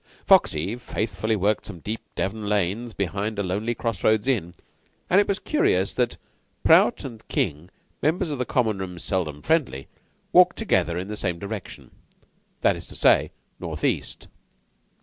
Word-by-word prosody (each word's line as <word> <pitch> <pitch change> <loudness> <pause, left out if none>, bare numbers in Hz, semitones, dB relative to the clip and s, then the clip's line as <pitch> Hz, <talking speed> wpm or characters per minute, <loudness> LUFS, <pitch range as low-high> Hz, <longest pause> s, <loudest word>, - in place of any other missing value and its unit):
Foxy 90 +9 +3
faithfully 110 -3 -2
worked 105 +1 0
some - - -8
deep 110 +6 -4
Devon 105 +1 -2
lanes 105 +4 0
behind 100 +2 -3
a 100 - 0
lonely 105 +6 -1
cross 115 -5 -3
roads 110 0 +3
inn; 95 -10 0 0.6
and 190 +3 +7
it - - -1
was 200 - 0
curious 370 - +1
that - - 0 0.5
Prout 240 - +5
and 115 -5 -9
King, 75 +5 -2 0.3
members 160 +3 +1
of 130 -3 -1
Common 110 -6 +1
room 90 -2 -5
seldom 85 -5 -3
friendly, 145 - 0 0.5
walked 180 0 +6
together 90 - +1
in 90 +2 -4
the 105 - -5
same 90 -4 -2
direction 100 +1 -7 0.7
that - - +3
is - - -9
to - - -11
say, - - +4 0.3
northeast. - - -3
105 Hz, 150 wpm, -24 LUFS, 95-125 Hz, 0.7 s, and